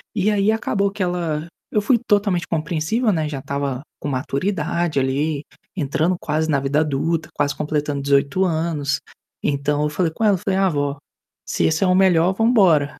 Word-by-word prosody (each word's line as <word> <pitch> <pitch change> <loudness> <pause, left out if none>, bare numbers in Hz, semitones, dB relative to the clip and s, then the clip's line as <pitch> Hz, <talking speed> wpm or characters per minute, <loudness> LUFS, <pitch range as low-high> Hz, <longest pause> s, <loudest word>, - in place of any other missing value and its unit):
E 200 +2 +2
aí 205 0 +2
acabou 200 -2 0
que 205 - -7
ela 170 -3 -2 0.2
eu 210 - +2
fui 240 +4 +3
totalmente 200 -5 +2
compreensível, 165 +8 0
né, 160 -5 0
já 145 -3 -4
estava 140 -1 -3 0.2
com - - -5
maturidade 160 +3 -1
ali, 140 +3 -1 0.3
entrando 160 +2 0
quase 155 +1 0
na 140 -2 +2
vida 140 +2 +1
adulta, 155 +2 -1
quase 145 0 0
completando 150 -1 -2
18 140 +6 +2
anos. 160 -4 -1 0.4
Então 145 +1 0
eu 150 - +1
falei 165 +2 0
com 225 - -3
ela, 205 -2 +5
eu - - -2
falei: 190 +2 -1
"Ah, 195 -1 +3
vó, 145 -2 -1 0.5
se - - -1
esse 160 +3 +2
é - - +3
o 180 - +3
melhor 185 -1 +4
vamos 225 +4 +2
embora". 160 - +4
160 Hz, 185 wpm, -21 LUFS, 145-190 Hz, 0.5 s, ela